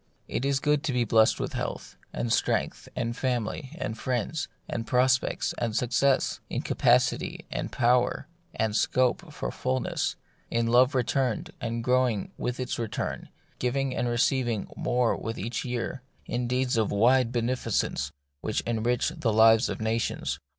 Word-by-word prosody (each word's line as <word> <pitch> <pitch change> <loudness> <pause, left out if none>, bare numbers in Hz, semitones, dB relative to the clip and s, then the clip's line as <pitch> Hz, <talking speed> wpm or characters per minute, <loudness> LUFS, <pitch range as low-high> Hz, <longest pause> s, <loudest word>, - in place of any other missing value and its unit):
It 130 - -2
is 140 -1 +2
good 150 0 +2
to 135 - 0
be 125 -1 +2
blest 110 0 +4
in - - -1
health, - - -4 0.2
and 115 - -1
strength, - - 0
and 120 -1 -2
family, 130 +3 -2
and 110 - -3
friends, 125 +5 -2 0.2
and 115 -1 -4
prospects, 130 +1 +2
and 115 -3 -1
suc 120 0 0
cess; 135 +2 +2
in - - -2
capacity, - - +2
and - - -3
power, 125 0 +2 0.3
and 110 -2 0
scope 130 +2 +1
for - - -4
usefulness; 65 +2 -1 0.3
in 115 0 +1
love 125 +3 +4
returned, 125 -1 0
and 115 0 -2
growing 125 -4 +1
with 125 +1 -3
its 125 -1 -3
return, 115 -2 -3 0.3
giving 130 +1 0
and 120 +1 0
receiving 120 -2 +1
more 125 -1 +1
with 115 0 -5
every 120 +4 -3
year; 125 +2 -3 0.2
in 120 0 -2
deeds 125 0 +1
of 110 -2 +2
wide 120 +3 +4
benefi 120 0 -1
cence - - 0 0.3
which 110 - -1
enrich 120 +1 0
the 115 - -1
lives 110 +2 +6
of - - -4
nations. 110 +1 -1
120 Hz, 155 wpm, -27 LUFS, 115-130 Hz, 0.3 s, lives